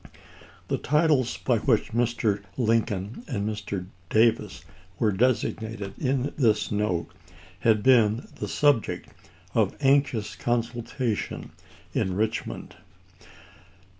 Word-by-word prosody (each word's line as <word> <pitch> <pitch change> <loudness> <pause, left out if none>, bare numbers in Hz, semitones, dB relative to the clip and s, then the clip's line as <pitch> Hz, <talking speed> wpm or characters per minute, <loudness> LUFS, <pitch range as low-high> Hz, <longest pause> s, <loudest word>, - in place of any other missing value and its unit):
The - - -1
titles 150 -4 +2
by 120 -4 +1
which 115 -2 +1
Mr. 115 -3 +1 0.2
Lincoln 115 - 0
and 105 -7 -2
Mr. 100 -3 -4 0.2
Davis 115 +1 +2 0.3
were 110 -2 +2
designated 110 -2 0
in 135 +1 0
this 110 -5 +2
note 90 -6 -1 0.5
had 110 -2 +3
been 115 -3 +4
the 105 - -4
subject 140 0 +1 0.4
of - - +2
anxious 135 -6 +2
consultation 120 -1 -2 0.4
in 95 -1 0
Eichmond. 110 +2 -2
115 Hz, 100 wpm, -26 LUFS, 105-125 Hz, 0.5 s, been